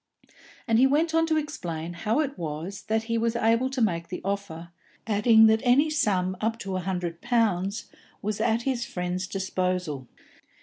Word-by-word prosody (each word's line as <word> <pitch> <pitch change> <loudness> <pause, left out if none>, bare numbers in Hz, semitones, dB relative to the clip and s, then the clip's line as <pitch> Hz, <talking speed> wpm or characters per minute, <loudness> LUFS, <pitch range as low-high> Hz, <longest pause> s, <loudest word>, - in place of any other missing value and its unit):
And 225 -1 +3
he 265 - +6
went 315 +4 +1
on 325 0 +3
to 315 -1 +2
explain 175 - -4
how 220 - 0
it 285 -2 -3
was 165 +5 -5
that 220 0 0
he 230 0 -1
was 230 +1 0
able 230 +2 +2
to 260 -3 0
make 170 -5 0
the 180 - -5
offer, 195 -4 -4 0.4
adding 220 +1 +5
that 220 0 +4
any 280 +5 +4
sum 185 -10 +1
up 225 +1 0
to 195 -1 -4
a - - 0
hundred 180 -2 -3
pounds 215 -5 0 0.3
was 210 0 -3
at 225 +1 +1
his 255 -3 -1
friend's 180 -2 -3
disposal. 180 -7 -2
210 Hz, 175 wpm, -26 LUFS, 180-235 Hz, 0.4 s, he